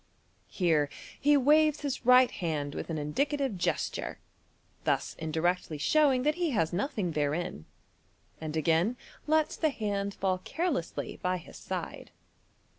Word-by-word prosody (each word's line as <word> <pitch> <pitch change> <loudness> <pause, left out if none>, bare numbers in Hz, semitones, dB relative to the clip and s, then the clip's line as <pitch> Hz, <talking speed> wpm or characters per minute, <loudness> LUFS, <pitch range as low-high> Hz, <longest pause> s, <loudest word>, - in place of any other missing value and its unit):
Here 160 -6 +1 0.3
he 290 +1 +5
waves 300 +2 +4
his 270 -4 -3
right 250 0 +7
hand 150 -5 -3
with - - -5
an 165 - -2
indi 150 - 0
cative 280 -6 -2
gesture, 175 - -2 0.7
thus - - 0
indirectly 160 +1 -1
showing 265 - +3
that 300 +2 +3
he 340 - +2
has 170 - 0
nothing 200 - -1
therein, 145 - -2 0.7
and 155 0 -4
again 165 - +2 0.3
lots 310 0 +2
the 315 - +1
hand 200 -5 -2
fall 185 -1 0
carelessly 320 - -3
by 180 0 0
his 170 - -12
side. - - -5
195 Hz, 135 wpm, -30 LUFS, -, 0.7 s, right